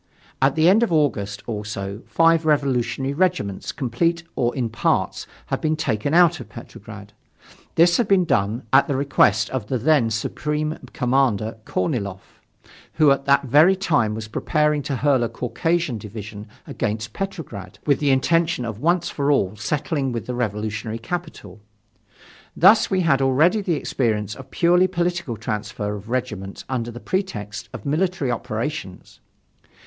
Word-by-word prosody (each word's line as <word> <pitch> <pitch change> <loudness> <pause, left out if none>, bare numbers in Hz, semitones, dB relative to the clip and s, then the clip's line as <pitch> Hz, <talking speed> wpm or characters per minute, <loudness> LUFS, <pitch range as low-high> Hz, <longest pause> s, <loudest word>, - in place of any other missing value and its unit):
At 135 +1 +3
the 160 +1 +4
end 200 +5 +5
of 235 - +1
August, 105 -10 0
also, 105 -2 -5
five 165 0 +3
revolutionary 140 -3 0
regiments, 165 - -1
complete 165 +5 -1
or 120 -2 0
in 125 -4 -1
parts, 110 0 -1 0.2
had - - -3
been 155 0 +1
taken 140 -4 -1
out 170 0 +5
of - - -10
Petrograd. - - -11 0.6
This 175 +1 +5
had 240 - +1
been 195 -3 +4
done 110 -3 0
at 135 - +6
the 140 - -1
request 140 0 +2
of 130 -6 -3
the 130 - -1
then 125 -1 +3
Supreme 150 +8 -2
Commander 125 -4 0
Korniloff, 95 0 -3 0.5
who 155 -3 +4
at 135 0 +1
that 140 0 +4
very 150 +8 +5
time 145 - +1
was 110 0 -6
preparing 150 +5 0
to 140 0 -3
hurl 135 0 +2
a 115 - -1
Caucasian 165 0 -1
division 105 0 -8 0.2
against 110 +1 -3
Petrograd, 160 - -6
with 140 -3 +2
the 145 - +1
intention 165 +1 +2
of 110 -2 -5
once 175 +3 +1
for 140 0 -1
all 100 -8 +1
settling 140 +3 -2
with 115 -1 -4
the 125 - -4
revolutionary 110 -1 -3
capital. 115 - -7 1.0
Thus 195 +6 +6
we 190 -1 +1
had 145 -6 +2
already 155 +11 +3
the 180 -4 0
experience 110 -7 -1
of 130 +2 -11
purely 180 +4 +3
political 175 -8 -2
transfer 105 -2 -4
of 105 +2 -10
regiments 110 -6 -4
under 120 -3 -2
the 120 0 -8
pretext 115 - -4
of - - -9
military 160 -1 0
operations. 115 -2 -5
135 Hz, 155 wpm, -22 LUFS, 110-165 Hz, 1.0 s, at